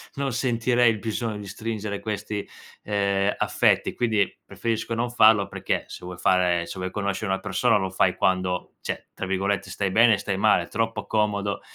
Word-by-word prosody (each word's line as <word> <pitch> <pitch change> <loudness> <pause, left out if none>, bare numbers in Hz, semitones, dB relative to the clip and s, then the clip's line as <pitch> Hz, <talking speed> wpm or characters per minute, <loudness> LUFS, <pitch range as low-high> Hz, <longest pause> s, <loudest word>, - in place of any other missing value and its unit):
non 140 -3 -2
sentirei 120 -1 +2
il 110 - -4
bisogno 110 0 -3
di 100 -1 -8
stringere 105 0 -4
questi, 105 -1 -4 0.4
ehm, 100 -1 +1
affetti. - - +2
Quindi, 110 -5 0
preferisco 115 0 -3
non 120 +1 -1
farlo, 110 -4 +5
perché - - -2
se - - -10
vuoi 90 0 -7
fare 90 -2 +2
se 95 - -8
vuoi 95 0 -4
conoscere 100 0 -2
una 95 - 0
persona 105 +4 +2
lo 95 -2 -2
fai - - +1
quando 90 -1 0
cioè, - - -5
tra - - -5
virgolette, 95 +1 -1
"stai 95 0 -2
bene" 115 +2 +6
e - - -5
"stai 100 -1 -2
male". 105 +3 +3
Troppo 115 0 -2
comodo 105 -2 0
105 Hz, 180 wpm, -25 LUFS, 95-115 Hz, 0.4 s, bene